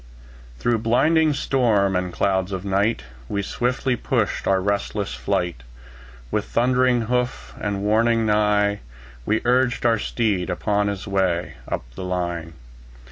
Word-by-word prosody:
Through 115 - +1
blinding 155 +8 +3
storm 110 -9 +2
and 90 0 -1
clouds 95 +1 0
of 95 0 -4
night, 100 - +1 0.3
We 100 0 -1
swiftly 125 +4 -1
pushed - - -1
our 95 -1 +3
restless 100 +1 -2
flight; 90 -8 -2 0.7
With - - 0
thundering 125 0 +2
hoof 125 +2 -2
and 100 -1 -2
warning 115 +2 +3
neigh, 105 -1 +2 0.5
We 110 +1 +1
urged 120 -1 +2
our 115 -2 +3
steed 105 -6 -1
upon 100 +3 0
his 100 -2 -3
way 90 -6 0
Up - - -3
the 95 - -7
line. 85 -3 -3
105 Hz, 135 wpm, -23 LUFS, 95-120 Hz, 0.7 s, blinding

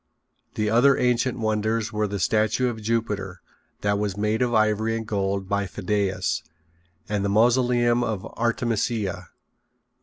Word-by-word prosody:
The 105 - 0
other 130 +5 +5
ancient 125 0 +1
wonders 110 0 -1
were 105 0 0
the 100 0 -4
Statue 110 +6 +1
of 110 -2 -6
Jupiter 105 -4 -2 0.4
that 100 0 +1
was 100 -2 -2
made 105 +2 0
of 125 -1 +1
ivory 110 0 +2
and 110 - -5
gold 100 -2 -2
by 100 0 -1
Phidias, 95 -3 -1 0.7
and 105 -1 -1
the 100 - 0
Mausoleum 120 +2 +3
of 105 -5 -3
Artemisia. 115 -5 -1
110 Hz, 140 wpm, -24 LUFS, 100-115 Hz, 0.7 s, other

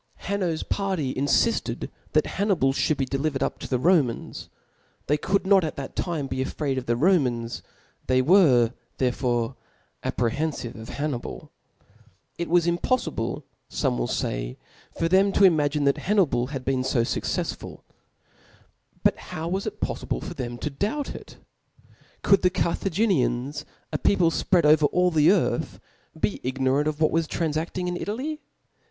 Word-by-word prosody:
Hanno's 185 -5 -1
party 190 -10 -1
infifted 145 - 0 0.2
that - - +4
Hapnii}^ 185 -10 +1
(hould 155 - +1
be 135 - 0
delivered 135 +1 -1
up - - -2
to - - -6
the 130 - 0
Romans 145 -4 +1 0.5
^. - - -44
They 150 - +2
could 195 +6 0
not 195 -1 +5
at 155 - -3
that 135 -1 -7
time 160 -6 -2
)>c 130 0 -1
|fraid 135 -1 -2
of 125 - -10
the 120 - +2
Romans^ 125 -7 +1 0.5
the/ 130 0 +3
were 130 - +5 0.2
therefore 125 -1 0 0.5
apprehenfive 125 0 -1
of 110 +1 -10
Hannibal. 145 -4 -4 0.9
It 170 - -2
was 175 0 +4
impoifiljle, 175 +9 -1 0.3
fome - - 0
will - - 0
fay, - - -3 0.4
for 165 - +1
thecp 195 +3 +3
to - - +4
imagine 150 -5 +4
that 140 -1 +2
Hannibal 170 - +2
had 135 -2 -6
been 130 -1 +1
fo 130 -2 +1
fqccefsfult 115 - -3 1.2
But - - +3
how 165 +2 -4
wajs 190 +1 -2
it - - -6
pofTible - - -3
for - - -6
them 120 -1 -5
to 150 - -4
doubt 215 - -2
of - - -6
it? - - -11 0.9
Could 195 -1 +5
the 180 - +4
Carthaginians, 160 - 0 0.3
a - - 0
people 175 -4 +3
fpread 175 -1 +2
over 150 0 +6
all 180 +2 +2
the 155 -1 +4
earthi 175 -3 +1 0.4
be 200 - 0
ignorant 130 +3 0
of 155 0 -2
what 155 - +4
was 165 -1 +1
tranfafting 165 +3 -2
in 180 - -2
Italy 265 - -3
150 Hz, 155 wpm, -25 LUFS, 130-180 Hz, 1.2 s, over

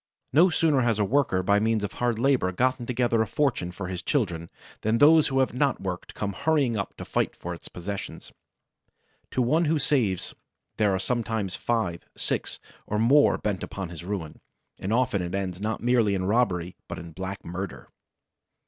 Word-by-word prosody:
No 170 +7 +6
sooner 160 -5 +3
has 115 -3 +2
a 105 - +2
worker 115 -6 +2
by 100 +2 +3
means 110 0 +1
of 100 - -2
hard 120 -2 0
labor 125 -6 +2
gotten 125 +4 0
together 120 -2 +1
a 110 - +1
fortune 125 -12 0
for 90 +1 -6
his 90 -1 -4
children 85 - -1 0.3
than 110 +2 +2
those 155 +3 +6
who 135 -1 +2
have 130 - 0
not 135 +1 +1
worked 90 -2 -5
come 100 -1 -2
hurrying 140 -1 +1
up 100 -2 -4
to - - -7
fight - - -1
for - - -5
its - - -10
possession. 100 +3 -6 1.1
To 130 - +1
one 155 +8 +3
who 160 +1 +2
saves 125 - +1 0.4
there 105 -2 +3
are 95 - +1
sometimes 110 -3 -1
five, 110 -8 -1
six - - -2 0.3
or 105 - -1
more 130 +7 +5
bent 100 -3 -2
upon 95 -3 -5
his 85 -1 -8
ruin; 90 -5 -5 0.4
and 95 - -3
often 120 -4 +2
it 90 +1 -3
ends 95 -1 -3
not 110 +1 -2
merely 120 -5 +3
in 95 -1 -1
robbery 95 -5 +1
but - - -6
in 85 0 -8
black 95 +3 -6
murder! 90 +2 -6
110 Hz, 185 wpm, -26 LUFS, 95-125 Hz, 1.1 s, No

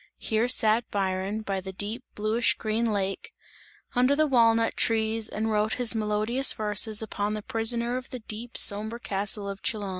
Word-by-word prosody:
Here 220 +2 0
sat 225 -2 +3
Byron, 195 +1 -2
by 195 -2 -3
the 190 +1 -7
deep 210 +6 -5
bluish 215 +3 +1
green 220 +1 -1
lake, 195 -2 -3 0.6
under 255 +3 +3
the 310 +1 +3
walnut 230 -4 +3
trees 220 0 0
and 220 +1 -2
wrote 210 0 +1
his 245 -2 +2
melodious 215 +4 +1
verses 215 0 +1
upon 210 0 -3
the 210 - -6
prisoner 235 +2 +1
of 255 - -8
the 255 - -6
deep 225 +1 -5
sombre 215 +3 +3
castle 200 -1 -2
of 200 0 -6
Chillon. 210 -3 -2
220 Hz, 170 wpm, -26 LUFS, 210-235 Hz, 0.6 s, sat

